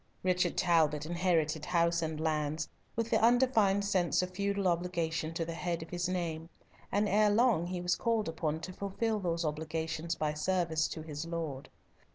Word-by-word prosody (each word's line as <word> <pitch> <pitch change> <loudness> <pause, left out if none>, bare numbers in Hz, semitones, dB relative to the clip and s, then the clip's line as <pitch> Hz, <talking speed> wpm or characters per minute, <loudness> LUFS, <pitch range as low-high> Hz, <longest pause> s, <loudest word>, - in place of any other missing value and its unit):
Richard 180 -1 +1
Talbot 155 -4 +3
inherited 165 -3 +1
house 170 -1 +2
and 160 -1 -3
lands, 155 -1 -1 0.3
with 230 0 -2
the - - +3
undefined 225 -4 +4
sense 185 -3 +2
of 180 - -4
feudal 200 +1 0
obligation 170 -2 -1
to 165 - -1
the 165 - -4
head 165 0 -2
of 160 - -13
his 175 0 -1
name, 165 -3 -3 0.4
and 205 +1 +2
ere 210 +2 +4
long 210 -5 +3
he 180 0 -3
was 180 0 +1
called 225 -2 0
upon 160 -1 -2
to 185 +3 -6
fulfil 210 +3 -1
those 170 -3 -1
obligations 160 +2 -2
by 150 -1 -1
service 165 -1 0
to 160 - -6
his 155 +1 -6
lord. 160 -5 -4
170 Hz, 175 wpm, -32 LUFS, 160-190 Hz, 0.4 s, undefined